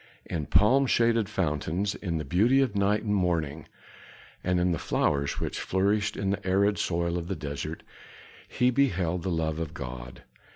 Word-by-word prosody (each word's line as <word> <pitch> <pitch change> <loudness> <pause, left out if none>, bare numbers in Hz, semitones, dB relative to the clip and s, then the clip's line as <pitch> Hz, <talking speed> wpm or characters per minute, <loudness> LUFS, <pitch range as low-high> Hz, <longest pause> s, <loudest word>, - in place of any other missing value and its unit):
In 75 -3 -4
palm 130 +6 +4
shaded 115 -3 +2
fountains, 90 +1 -1
in 85 -5 -3
the 75 - -4
beauty 115 +10 +3
of 130 -6 +1
night 100 +1 +2
and 105 - 0
morning, 85 -5 -1 0.8
and 90 0 +1
in 90 0 +2
the 85 - -1
flowers 70 -1 0
which - - -3
flourished 100 +2 0
in 95 -1 0
the 100 - -3
arid 100 +2 +2
soil 85 0 0
of 85 - -7
the 95 - -2
desert, 75 +1 -5 0.6
he 125 +1 +2
beheld 90 -10 +1
the 95 - -2
love 80 -2 -1
of 80 -1 -5
God. 60 -2 -8
90 Hz, 170 wpm, -27 LUFS, 80-105 Hz, 0.8 s, palm